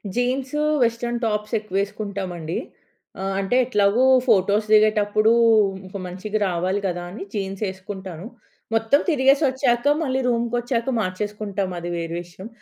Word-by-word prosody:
Jeans, 260 +4 -1 0.2
western 235 +1 -1
టాప్సేక్కువేసుకుంటామండి. 200 -5 -3 0.7
ఆహ్, 195 0 -2
అంటే 195 +5 0
ఎట్లాగో 210 0 +2 0.2
ఫోటోస్ 205 0 +3
దిగేటప్పుడు 215 0 +4 0.5
ఇంక 190 +2 -7
మంచిగా 195 +4 -4
రావాలి 185 +3 -1
కదాని 175 +3 -5
జీన్సేసుకుంటాను. 190 -2 -5 0.5
మొత్తం 225 +5 +3
తిరిగేసి 275 -1 +3
ఒచ్చాక 255 -2 0 0.2
మళ్ళీ 265 -2 0
రూమ్‌కొచ్చాక 240 +1 -1
మార్చేసుకుంటాం, 205 0 -3
అది 175 0 -5
వేరే 165 0 -4
విషయం. 180 +3 -11
210 Hz, 105 wpm, -22 LUFS, 190-235 Hz, 0.7 s, దిగేటప్పుడు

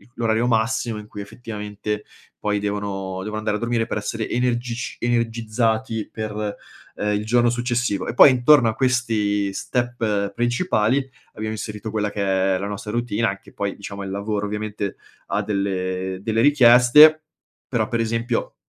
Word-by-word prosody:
l'orario 115 0 +1
massimo 115 0 0
in 105 - -10
cui, 105 -1 -8
effettivamente, 105 -1 -6 0.3
poi 105 0 0
devono 100 -2 -3
devo 105 +1 -4
andare 110 -1 -1
a - - -8
dormire 120 -1 0
per - - -2
essere 110 +1 -3
energic 120 -1 -1
energizzati 115 -1 -1
per, 105 -1 -4 0.4
ehm, 105 0 -1
il 105 - -2
giorno 120 +1 +3
successivo. 120 -4 -1
E - - -4
poi 135 - +9
intorno 130 0 +5
a - - -1
questi 110 -6 +1
step 110 -4 -1
principali 120 - +1 0.3
abbiamo 110 0 -4
inserito 105 0 -6
quella 105 -1 -1
che 95 -1 +1
è - - 0
la 100 - -3
nostra 105 +1 -6
routine, 115 -1 0
anche 100 -1 -6
poi, 100 -1 -3
diciamo, 100 0 -8
il 95 - -5
lavoro, 100 +1 -2
ovviamente, 105 -1 -4 0.3
ha - - -1
delle 95 -2 -2
delle 110 +1 +1
richieste, 145 +3 +7 0.4
però, 115 -4 0
per 115 -2 -1
esempio, 115 +1 -1
110 Hz, 155 wpm, -22 LUFS, 105-120 Hz, 0.4 s, poi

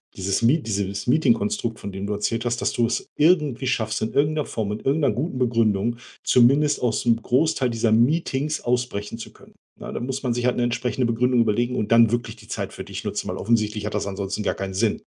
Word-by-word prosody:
dieses 95 +3 -1
Me 125 +8 +4
dieses 100 -4 -3
Meeting-Konstrukt, 185 - +1
von 100 - -6
dem 95 +1 -5
du 105 - -1
erzählt 115 +3 -1
hast, 120 0 -1
dass - - +1
du 120 - +2
es - - -3
irgendwie 150 -6 +2
schaffst, 110 -3 -1
in 110 - -1
irgendeiner 150 +1 +1
Form 105 -3 -3
und 105 - -5
irgendeiner 140 -3 +2
guten 130 +3 -3
Begründung 115 -2 +1 0.3
zumindest 140 +4 +4
aus'm 115 -1 +1
Großteil 130 0 +1
dieser 115 -1 0
Meetings 145 +4 +1
ausbrechen 120 -3 -2
zu - - -8
können. - - -19 0.3
Ja, - - -7
da - - -4
muss 135 +2 -4
man 120 -2 0
sich 120 +1 -2
halt 125 - +1
'ne 120 - +1
entsprechende 120 +1 -1
Begründung 120 +1 +2
überlegen 120 +3 +1
und 105 - -2
dann 115 -1 +6
wirklich 120 -1 -2
die 110 -1 -17
Zeit - - -4
für - - -7
dich - - -7
nutzen, - - -3
weil - - -3
offensichtlich 105 -2 0
hat 105 - -4
das 100 - -2
ansonsten 100 +1 -3
gar - - 0
keinen 95 -1 -5
Sinn. 105 +2 0
120 Hz, 220 wpm, -23 LUFS, 105-130 Hz, 0.3 s, dann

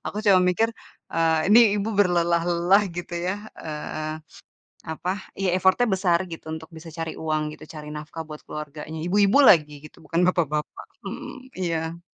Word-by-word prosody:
Aku - - -5
cuma 195 -3 +6
mikir, 180 +5 +2 0.4
eee, 165 -1 +2
ini 225 - +9 0.2
ibu 205 +1 -1
berlelah-lelah, 175 +1 +3
gitu 175 0 -6
ya. 185 - +1 0.3
Eee, 155 0 -5 0.7
apa, 175 +3 -2 0.2
ya 195 -1 -1
effort-nya 190 +6 +3
besar, 180 -3 +2
gitu, 160 - -8
untuk 160 +1 -7
bisa 160 +1 -10
cari 165 0 -5
uang, 155 -1 -2
gitu, - - -11
cari 150 -2 -8
nafkah 155 +2 -7
buat 150 0 -8
keluarganya. 150 +1 -7
Ibu-ibu 205 +7 +4
lagi, 150 - +6
gitu, 155 - -14
bukan 175 +1 0
bapak 170 -5 +2
bapak. 150 - -4 0.2
Mmm, 260 0 -8
iya. 165 -1 -2
170 Hz, 160 wpm, -24 LUFS, 155-185 Hz, 0.7 s, ini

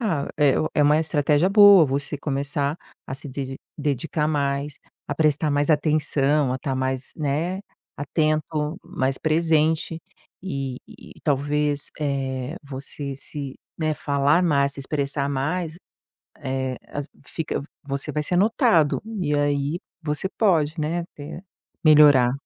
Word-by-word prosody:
Ah, 180 -11 -1
é 145 -3 +5 0.2
é 150 - +4
uma 150 +1 +5
estratégia 150 +2 +2
boa 200 -4 +8
você 140 +1 -2
começar 140 +1 -1 0.3
a 135 - -4
se 140 - -7
dedi 135 0 -5 0.2
dedicar 150 +1 -1
mais, 140 -1 -1 0.3
a 145 - -1
prestar 155 0 +2
mais 145 +2 +2
atenção, 150 -2 +2
a 130 - -1
estar 135 0 -3
mais, 130 0 -2
né, 160 +6 -1 0.4
atento, 155 +2 -1
mais 130 0 -1
presente 160 0 +1 0.4
e 135 -7 -4
e - - -14
talvez, 145 0 0
eh, 135 0 -2
você 140 0 -6
se 140 -1 -7 0.2
né, 155 -1 0
falar 145 +4 +2
mais, 140 -4 +2
se - - -7
expressar 140 0 -2
mais, 155 +5 -2 0.6
eh, 130 -3 -3
as 145 0 -5 0.2
fica 160 -3 -3 0.2
você 140 -1 -3
vai 150 - -1
ser 175 +4 -1
notado. 200 - +3 0.2
E 150 -3 0
aí 145 +2 0 0.2
você 150 +4 -2
pode, 165 -7 +2
né, 170 +3 -1
te 145 +4 -8 0.4
melhorar. 145 -5 +7
145 Hz, 135 wpm, -23 LUFS, 140-155 Hz, 0.6 s, boa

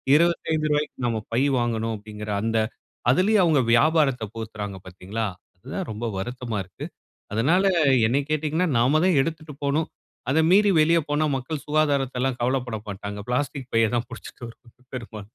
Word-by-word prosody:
ரூ.25 155 -2 +1
க்கு 125 - -6
நம்ப 110 -2 -1
பை 125 - +2 0.2
வாங்கனு 115 -1 -1
அப்படீங்குற 105 0 -7
அந்த 115 0 0 0.5
அதுலேயும் 195 +6 +4
அவங்க 150 -5 +4
வியாபாரத்த 135 -2 +3 0.6
பாத்தீர்களா 100 +5 -4 0.3
அதுதான் 135 - -5
ரொம்ப 110 +3 -5
வருத்தமா 120 +2 -4
இருக்குது. 95 - -9 0.4
அதுனால 160 - +3 0.4
என்னைய 140 +4 +1
கேட்டீங்கன்னா, 155 +4 0
நம்ப 140 +6 +3
தான் 180 -6 +3
எடுத்துட்டு 155 -1 -4
போகணும். 145 +3 +1 0.4
அத 150 +4 +3
மீறி 205 +1 +6
வெளியே 165 +1 +4
போனா 150 +1 +1
மக்கள் 140 +3 -5
சுகாதாரத்த 140 -4 +1
எல்லாம் 130 -1 0
கவலைப்பட 125 -2 0
மாட்டாங்க. 100 +1 -6
பிளாஸ்டிக் 135 0 -2
பைய 115 -1 +4
தான் 120 0 -1
பிடிச்சி - - -9
வரும் 125 +2 -16
பெரும்பாலும் 115 -3 -7
130 Hz, 145 wpm, -24 LUFS, 115-155 Hz, 0.6 s, மீறி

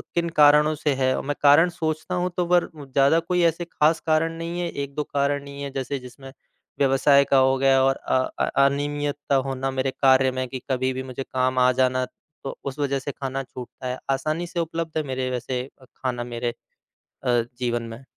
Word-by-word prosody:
किन 170 -1 +1
कारणों 150 +1 +6
से 145 -1 0
है। 130 -1 +1
मैं 145 +1 -3
कारण 145 +5 +6
सोचता 160 +1 -3
हूँ 180 0 0
तो 180 - +1
वर 175 0 +2
ज़्यादा 140 +2 +2
कोई 175 +2 0
ऐसे 165 +1 +1
खास 160 -1 +2
कारण 160 +1 +2
नहीं 170 +1 -4
है, 175 - -2
1-2 140 +1 -4
कारण 140 0 -1
ही 140 0 -8
है। 140 - -4
जैसे 135 +1 -3
जिसमें 135 +2 -12 0.5
व्यवसाय 140 +1 +5
का 135 - +6
हो 130 0 +4
गया 135 0 +4
और 135 0 +3
अ 130 - -1 0.2
अ, - - +3 0.2
अनियमित्ता 145 0 -1
होना 135 0 -2
मेरे 130 0 -1
कार्य 130 -1 +4
में, 130 0 -3
कि 130 +1 -6
कभी 130 0 0
भी 130 +1 -4
मुझे 130 +1 -6
काम 130 0 0
आ 125 0 +5
जाना 130 0 +2 0.4
तो 135 - -6
उस 140 +1 -5
वजह 140 -1 0
से 140 +1 -5
खाना 135 0 -4
छूटता 130 0 -9
है। 125 +1 -3
आसानी 155 +6 -1
से 170 - -4
उपलब्ध 165 -1 -3
है 155 - 0
मेरे 130 0 -2
वैसे 125 +1 -3 0.2
खाना 125 -1 -4
मेरे 120 0 -3 0.7
अ, 120 -1 +2 0.2
जीवन 120 -1 -1
में। 115 +3 -9
135 Hz, 200 wpm, -24 LUFS, 130-150 Hz, 0.7 s, कारणों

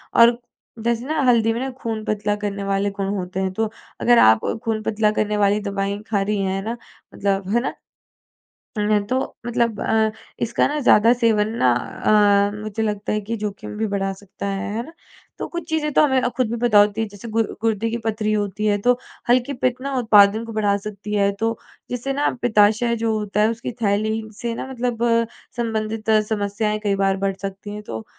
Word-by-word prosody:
और 235 0 +6 0.5
जैसे 235 +1 0
ना 310 +1 -1
हल्दी 225 -2 +3
में 230 - -3
ना 265 - -2
खून 225 -2 -3
पतला 210 0 0
करने 200 0 -3
वाले 195 0 0
गुण 195 - 0
होते 185 -1 -4
हैं, 190 0 0
तो 220 +2 -1 0.3
अगर 240 -1 +5
आप 110 0 +3 0.2
खून 220 -1 0
पतला 215 0 +1
करने 210 0 0
वाली 205 0 +3
दवाई 200 0 -2
खा 205 -3 +1
रही 205 +1 0
हैं 190 0 -1
ना 230 +3 -3 0.4
मतलब 195 -1 -1
है - - +5
ना? - - -3 1.1
है 210 0 +2
तो 255 - +1 0.3
मतलब 235 -2 0
अ, 220 0 +2 0.3
इसका 230 - +1
ना 300 +1 -2
ज़्यादा 230 -4 +5
सेवन 225 -3 +2
ना 125 - +5
अ, 205 - +3
मुझे 215 +1 -4
लगता 210 -1 -2
है 215 - 0
कि 220 +3 -4
जोखिम 210 0 -5
भी 220 +1 0
बढ़ा 195 -1 0
सकता 200 0 -9
है, 200 +1 -3
है 230 - -2
ना? 325 - -13 0.5
तो - - -3
कुछ 345 -2 -6
चीज़ें 310 -1 0
तो - - +5
हमें 265 -3 +3
अ, 245 - +1
खुद 255 -4 +1
भी 235 - -2
पता 210 -3 +6
होती 205 +1 +3
हैं 220 - -1
जैसे 205 +3 -10
गुर 225 -1 +1
गुर्दे 225 0 0
की 230 - -2
पथरी 215 -1 0
होती 205 0 -1
है 205 -1 +3
तो 245 0 +5 0.3
हल्की 250 +3 +3
पित्त 255 -1 -1
ना 275 +1 -3
उत्पादन 215 -1 +5
को 230 - -8
बढ़ा 205 -2 +2
सकती 210 0 -6
है, 200 -1 +3
तो 225 +3 -2 0.3
जिससे 250 +3 -3
ना 285 +2 +1
पिताशय 220 +1 +3
जो 225 -1 +1
होता 210 0 -1
है 215 - +4
उसकी 230 +2 -5
थैली 215 +1 +1 0.3
से 235 -1 -2
ना 260 - -5
मतलब 240 -2 -2 0.5
संबंधित 220 -1 -2 0.2
समस्याएँ 210 0 -1
कई 200 -1 +1
बार 195 0 +2
बढ़ 195 -1 0
सकती 195 +1 -6
हैं। 210 - -6
तो, 110 - -6
215 Hz, 205 wpm, -22 LUFS, 205-230 Hz, 1.1 s, और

